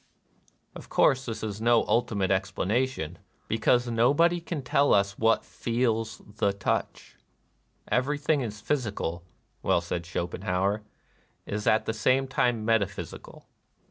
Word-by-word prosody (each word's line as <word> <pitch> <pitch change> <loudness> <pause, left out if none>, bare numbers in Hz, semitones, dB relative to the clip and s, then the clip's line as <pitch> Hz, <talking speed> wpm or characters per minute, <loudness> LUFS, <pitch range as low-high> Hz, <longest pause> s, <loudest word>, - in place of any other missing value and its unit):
Of - - -10
course 135 0 +3
this 115 -1 -4
is 105 -1 -4
no 120 0 +4
ultimate 100 -5 +1
expla 95 0 -1
nation, 105 -7 -1 0.3
because 120 +2 +2
nobody 145 +10 +3
can 165 -4 -5
tell 140 +3 +3
us 100 0 +1
what 115 0 +3
feels 115 -4 -1
the 100 - +2
touch, 100 - -3 0.4
" - - -43
Everything 145 -2 0
physical," 105 - -3 0.4
well - - +2
said 85 0 -4
Schopenhauer, 90 +3 -1 0.6
"is 105 0 -4
at 110 - +3
the 110 - -1
same 130 +5 +2
time 120 -4 0
meta 115 -3 +3
physical." - - -10
110 Hz, 130 wpm, -27 LUFS, 100-125 Hz, 0.6 s, no